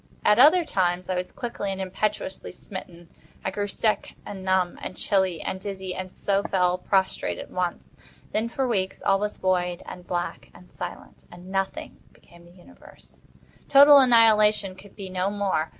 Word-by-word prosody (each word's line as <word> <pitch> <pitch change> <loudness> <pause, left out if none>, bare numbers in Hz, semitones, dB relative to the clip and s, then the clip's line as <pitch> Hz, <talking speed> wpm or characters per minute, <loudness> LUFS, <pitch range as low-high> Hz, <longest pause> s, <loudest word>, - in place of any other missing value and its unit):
At 210 - +5
other 320 +6 +7
times 180 - 0
I 185 - 0
was 180 0 -3
quickly 235 -5 -4
and 190 - -5
impetuously 190 +1 -3
smitten. 180 -2 -10 0.4
I 190 - 0
grew 205 +1 -2
sick, 215 +1 -1
and 195 -2 -7
numb, 185 -1 +1
and 185 - -7
chilly, 190 -5 +1
and 190 - -4
dizzy, 190 -2 -5
and 185 0 -6
so 200 0 +1
fell 180 -2 +1
prostrate 190 +1 0
at - - -9
once. 180 -1 -4 0.4
Then, 220 +2 -1
for 265 +2 -1
weeks, 190 -5 -1
all 195 0 +3
was 210 0 -3
void, 180 -1 0
and 180 0 -10
black, 175 -1 -4
and 180 - -17
silent, - - -9
and 175 +2 -12
Nothing 195 0 -3 0.2
became 170 0 -20
the 175 - -17
universe. 180 0 -17 0.5
Total 285 +1 +9
annihilation 215 -5 +4
could 190 +1 -16
be 195 -2 -7
no 185 +1 -1
more. 200 -6 -1
190 Hz, 170 wpm, -25 LUFS, 180-210 Hz, 0.5 s, Total